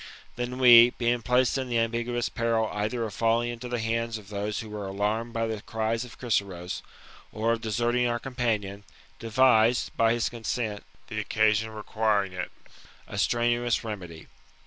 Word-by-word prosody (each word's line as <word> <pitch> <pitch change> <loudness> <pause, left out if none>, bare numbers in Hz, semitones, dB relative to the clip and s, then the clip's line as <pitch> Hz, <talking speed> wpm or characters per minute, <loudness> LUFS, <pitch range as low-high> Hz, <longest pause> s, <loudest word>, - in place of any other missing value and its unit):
" - - -26
Then 125 +1 -4
we, 120 -2 +9
being 120 0 +1
placed 125 +2 +2
in 130 -1 -4
the 120 - +1
ambiguous 115 +1 0
peril 115 -2 0
either 110 +3 -2
of 110 -3 -4
falling 115 +3 +1
into 120 +1 -6
the 120 - -1
hands 115 0 -1
of 105 -2 -13
those 105 0 -3
who 110 - -9
were 105 -2 -5
alarmed 105 +4 -1
by 115 -1 -1
the 110 -2 -4
cries 110 +2 -2
of 125 - -12
Chryseros, 100 -7 -2 0.5
or 110 +2 0
of 115 -1 -1
deserting 120 +2 +1
our 120 0 0
companion, 110 -6 -2 0.4
devised, 115 0 +3
by 115 0 +3
his 120 -1 0
con 120 -2 -8
sent, 110 -4 -2 0.2
the 110 - -5
occasion 110 +1 +2
requiring 105 -2 -1
it, 90 - -4 0.6
a - - -5
strenuous 120 0 +1
remedy. 90 -8 -7
115 Hz, 170 wpm, -27 LUFS, 105-120 Hz, 0.6 s, we